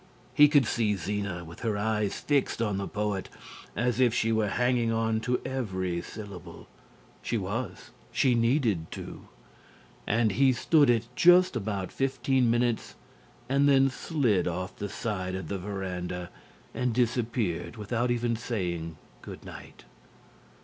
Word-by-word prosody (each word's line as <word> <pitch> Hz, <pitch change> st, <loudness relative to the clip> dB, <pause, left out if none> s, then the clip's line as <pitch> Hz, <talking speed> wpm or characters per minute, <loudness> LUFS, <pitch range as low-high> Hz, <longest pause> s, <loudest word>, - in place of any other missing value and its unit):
He 150 Hz, -1 st, +8 dB
could 145 Hz, -3 st, +4 dB
see 110 Hz, -2 st, +1 dB
Zena 100 Hz, -2 st, -3 dB
with 85 Hz, +1 st, -11 dB
her 110 Hz, -3 st, -1 dB
eyes 105 Hz, -1 st, -1 dB
fixed 145 Hz, -5 st, +1 dB
on 105 Hz, -4 st, 0 dB
the 100 Hz, -, -3 dB
poet 105 Hz, -2 st, -2 dB, 0.5 s
as 125 Hz, +1 st, 0 dB
if 120 Hz, -3 st, +4 dB
she 115 Hz, -1 st, +1 dB
were 110 Hz, -1 st, +2 dB
hanging 120 Hz, +1 st, +1 dB
on 115 Hz, 0 st, +1 dB
to 125 Hz, +3 st, 0 dB
every 95 Hz, -9 st, -2 dB
syllable 100 Hz, -3 st, -10 dB, 0.5 s
(she 115 Hz, -, -1 dB
was; 105 Hz, +1 st, -4 dB, 0.2 s
she 130 Hz, -, +3 dB
needed 115 Hz, -, +1 dB
to), -, -, -8 dB, 0.8 s
and 110 Hz, 0 st, +2 dB
he 130 Hz, +6 st, +4 dB
stood 145 Hz, +2 st, +4 dB
it 115 Hz, -1 st, +3 dB
just 180 Hz, 0 st, +6 dB
about 100 Hz, -4 st, -3 dB
fifteen 135 Hz, -2 st, +1 dB
minutes 120 Hz, -1 st, 0 dB, 0.5 s
and 140 Hz, +2 st, +3 dB
then 135 Hz, -1 st, +5 dB
slid 125 Hz, -, 0 dB
off 90 Hz, +1 st, -3 dB
the 100 Hz, -, -5 dB
side 95 Hz, -5 st, -3 dB
of 95 Hz, -, -5 dB
the 100 Hz, -, -2 dB
verandah 90 Hz, -2 st, -4 dB, 0.4 s
and 125 Hz, -2 st, -1 dB
disappeared 115 Hz, -7 st, -1 dB
without 120 Hz, +4 st, -1 dB
even 120 Hz, -1 st, 0 dB
saying 85 Hz, -9 st, -3 dB, 0.2 s
good -, -, -10 dB
night. -, -, -11 dB
110 Hz, 140 wpm, -28 LUFS, 95-125 Hz, 0.8 s, He